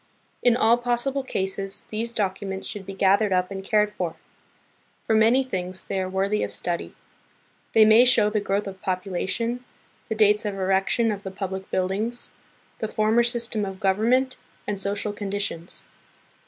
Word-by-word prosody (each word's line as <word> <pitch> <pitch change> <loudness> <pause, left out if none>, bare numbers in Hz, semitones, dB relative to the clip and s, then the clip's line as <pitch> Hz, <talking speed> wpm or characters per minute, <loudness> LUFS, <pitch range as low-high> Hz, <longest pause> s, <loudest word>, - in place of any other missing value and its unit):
In 245 -1 +4
all 235 -1 +4
possible 245 +3 -1
cases 195 -5 -2
these 225 +2 -2
documents 195 -3 -2
should 200 -3 -7
be 195 - -5
gathered 200 +2 +3
up 180 +1 +1
and 195 0 -5
cared 210 +1 +2
for. 175 -5 -3 0.9
For - - +1
many 225 +5 +5
things, 185 -6 -4
they 195 - -2
are 185 0 -2
worthy 195 +2 0
of - - -2
study. 175 -1 -3 0.8
They 220 -1 +7
may 220 +3 +7
show 240 -4 +5
the 210 - +1
growth 200 0 -1
of 195 -1 -8
population, 190 +6 -2 0.5
the 220 - -1
dates 210 -1 +4
of 205 -2 -3
erection 195 +4 +1
of 200 -1 -4
the 195 - -6
public 190 0 -5
buildings, 205 +6 -2 0.5
the 220 - -2
former 215 +2 +2
system 235 -2 0
of 190 -1 -5
government, 230 +7 +2 0.3
and 205 -2 -2
social 200 +1 -1
conditions. 200 -4 -4
205 Hz, 160 wpm, -25 LUFS, 190-225 Hz, 0.9 s, They